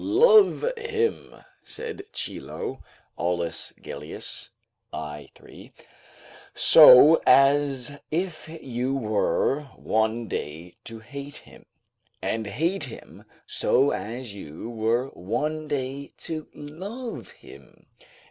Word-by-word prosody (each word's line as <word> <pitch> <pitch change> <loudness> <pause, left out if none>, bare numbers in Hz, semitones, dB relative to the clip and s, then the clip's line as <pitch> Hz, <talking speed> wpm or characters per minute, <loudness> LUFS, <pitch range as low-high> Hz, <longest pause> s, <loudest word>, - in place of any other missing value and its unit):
"Love 430 +5 +5
him," 455 -1 -2 0.3
said 450 -1 -6
Chilo, 135 - -6 0.4
[Aulus 85 -1 -2
Gellius, 75 +1 -3 0.4
i. 75 -1 -7
3.] - - -15 0.8
"so 150 +6 +8
as 135 -2 +4 0.2
if 170 -1 -3
you 130 +1 -2
were 115 +4 0
one 110 +1 -1
day 80 +2 -6
to 115 -1 -8
hate 140 +4 -9
him; - - -16 0.5
and 110 -1 -2
hate 160 - -1
him 125 - -12 0.2
so 140 +2 +2
as 120 0 -5
you 95 +3 -8
were 115 +3 0
one 150 - -3
day 140 0 -4
to 155 -1 -6
love 200 - -7
him." - - -17
135 Hz, 100 wpm, -25 LUFS, 110-155 Hz, 0.8 s, so